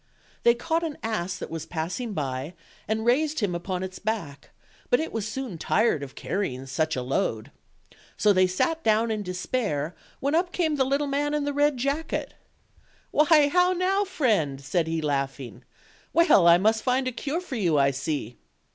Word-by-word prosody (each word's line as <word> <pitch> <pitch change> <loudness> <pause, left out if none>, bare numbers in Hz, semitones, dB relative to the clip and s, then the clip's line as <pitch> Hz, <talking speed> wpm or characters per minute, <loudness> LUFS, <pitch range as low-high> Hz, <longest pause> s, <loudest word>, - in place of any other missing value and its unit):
They 235 0 +5
caught 325 +7 -1
an 320 -3 -4
ass 215 -5 -2
that - - -7
was 165 -1 -5
passing 180 +8 -3
by, 140 +1 -3 0.3
and 220 +1 -1
raised 300 +6 +2
him 205 -6 0
upon 180 +1 -3
its 185 0 -6
back; 200 -10 -4 0.4
but 245 - +4
it 320 - -3
was 220 -2 -2
soon 225 -6 -5
tired 215 -3 +2
of 135 -1 -8
carrying 135 -10 -3
such 155 +4 -1
a 125 - -2
load. 125 -1 -1 0.7
So 210 -1 +4
they 185 -1 +4
sat 320 - 0
down 220 +1 +2
in 215 -1 -1
despair, 180 - -2 0.2
when 280 +2 -1
up 350 +2 +2
came 320 -5 0
the 265 - +3
little 280 +2 +1
man 290 +1 0
in 295 - 0
the 290 0 -2
red 290 -1 +2
jacket. 280 +6 -2 0.8
"Why, 300 -1 +5
now 360 0 +4
now, 375 +3 +1
friend?" 215 - 0
said 160 +4 -1
he, 165 0 -1
laughing; 135 -3 -3 0.5
"well, 335 - +5
I 170 0 +8
must 220 +4 +2
find 255 +2 +1
a - - 0
cure 285 +7 -3
for 360 -7 -7
you, 170 -8 +2
I 140 0 +4
see." 135 -3 -4
220 Hz, 180 wpm, -26 LUFS, -, 0.8 s, I